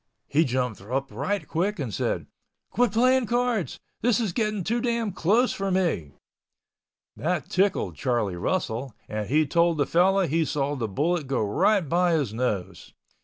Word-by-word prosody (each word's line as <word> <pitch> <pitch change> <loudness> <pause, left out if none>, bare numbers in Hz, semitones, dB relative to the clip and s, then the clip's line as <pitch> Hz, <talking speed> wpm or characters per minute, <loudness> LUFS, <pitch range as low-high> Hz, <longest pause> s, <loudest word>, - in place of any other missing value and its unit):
He 155 +3 +3
jumped 125 -4 -2
up 130 +6 -3
right 155 - -2
quick 195 +6 -1
and - - -4
said, - - -1 0.5
"Quit 245 -3 +2
playing 250 +2 +3
cards. 240 -5 0 0.2
This 245 +1 +3
is 215 -7 -1
getting 215 -3 -1
too 235 +6 0
damn 235 -3 0
close 215 +9 +2
for 195 0 -2
me!" 170 - 0 1.0
That 165 -2 -2
tickled 195 +1 +1
Charlie 120 -8 0
Russell 120 - -2
and 105 -1 -4
he 155 +3 +3
told 170 +2 +2
the 145 - +2
fellow 190 +5 +3
he 165 +2 +1
saw 145 -1 -1
the 120 -5 -2
bullet 150 - -1
go 130 -4 0
right 175 - +2
by 175 +3 +2
his 140 -10 0
nose. 110 -6 -3
170 Hz, 165 wpm, -26 LUFS, 130-205 Hz, 1.0 s, He